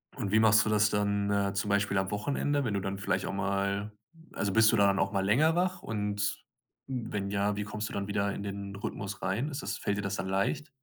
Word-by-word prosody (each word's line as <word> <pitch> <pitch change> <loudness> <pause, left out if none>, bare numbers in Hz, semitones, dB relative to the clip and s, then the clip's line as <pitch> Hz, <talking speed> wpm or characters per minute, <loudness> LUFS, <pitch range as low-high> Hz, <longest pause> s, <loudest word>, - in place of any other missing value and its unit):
Und 105 -7 -3
wie 110 - +5
machst 110 0 +5
du - - 0
das 105 -1 +4
dann, 100 0 0
äh, 100 -1 +1
zum 100 +1 -1
Beispiel 100 0 +1
am 95 0 0
Wochenende, 140 +6 0
wenn 115 -5 -1
du 100 - +1
dann 95 0 -4
vielleicht 95 -1 -1
auch - - -3
mal 100 +1 -1 0.4
also, 100 -1 -2
bist 110 0 +6
du 115 - +2
dann 100 -1 +4
auch 95 - +1
mal 95 -2 0
länger 150 +11 +4
wach 185 +1 0
und 105 -1 -2 0.4
wenn 105 -6 -3
ja, 100 +1 +1
wie 105 - -2
kommst 105 +1 -4
du - - -9
dann 100 0 -3
wieder 100 0 0
in 100 - -5
den 100 0 -5
Rhythmus 100 0 -5
rein? 105 +10 0
Ist 140 -1 -5
das - - -3
fällt 100 - -1
dir 100 - -1
das 100 0 -2
dann 85 - -3
leicht? 100 +10 0
100 Hz, 245 wpm, -30 LUFS, 100-110 Hz, 0.4 s, bist